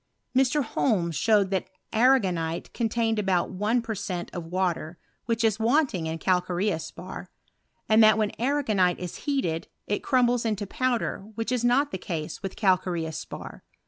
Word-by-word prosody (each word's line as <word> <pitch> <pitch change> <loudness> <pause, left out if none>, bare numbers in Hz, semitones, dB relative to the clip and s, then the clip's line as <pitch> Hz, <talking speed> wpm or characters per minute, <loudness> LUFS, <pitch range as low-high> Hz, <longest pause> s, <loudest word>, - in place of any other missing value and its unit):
Mr. 270 +3 +3
Holme 205 -7 0
showed 200 +3 +2
that 190 -1 -1 0.2
arrago 235 -3 +4
niti! 165 -1 -3
contained 225 -1 0
about 190 -4 +1
one 210 +6 0
per 225 - -3
cent, 185 -3 -4
of 175 -2 -5
water, 175 -2 -1 0.3
whicli 230 0 +1
is 220 -1 +2
wanting 230 - +2
in 160 0 -3
calcareous 180 -1 0
spar; 185 +2 -9 0.6
and 220 +1 +6
that 215 -1 +6
when 215 -2 +1
ana». 285 +4 +1
gonite 190 -7 +2
is 180 -2 -6
heated, 170 - -1 0.2
it 205 - -1
crumbles 245 -2 +2
into 210 -3 -1
powder, 255 +1 -1 0.2
which 225 +3 -2
it 250 -2 0
not 270 +4 +3
the 190 - -4
case 165 -3 -5
with 195 - -5
calcareous 180 -5 0
spar. - - -9
205 Hz, 165 wpm, -26 LUFS, 180-235 Hz, 0.6 s, and